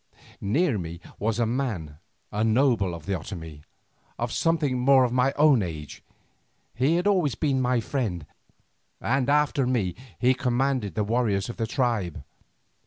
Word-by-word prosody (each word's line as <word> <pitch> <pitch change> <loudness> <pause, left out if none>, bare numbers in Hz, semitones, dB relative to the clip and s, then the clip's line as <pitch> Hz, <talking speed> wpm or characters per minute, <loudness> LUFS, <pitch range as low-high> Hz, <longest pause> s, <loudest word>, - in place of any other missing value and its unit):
Near 120 - +1
me 85 -1 -6 0.2
was 110 +1 0
a 120 - +2
man, 110 - -3 0.3
a 105 +1 0
noble 115 -5 +2
of 80 -2 -11
the 100 - -1
Otomie, 80 -4 -6 0.6
of - - -2
something 155 -6 +1
more 130 0 +5
than 125 0 -2
my 130 +1 +3
own 145 -5 +5
age. 80 -5 -6 0.7
He 135 +7 +2
had 175 +2 0
always 180 - +2
been 135 -2 0
my 125 -1 +2
friend, 105 - -3 0.7
and 135 +2 0
after 145 -2 +2
me 110 -9 0 0.2
he 125 +2 +3
commanded 130 -3 0
the 105 - +1
warriors 105 -3 0
of 120 - -7
the 115 -1 -1
tribe. 110 - -1
120 Hz, 155 wpm, -26 LUFS, 100-135 Hz, 0.7 s, more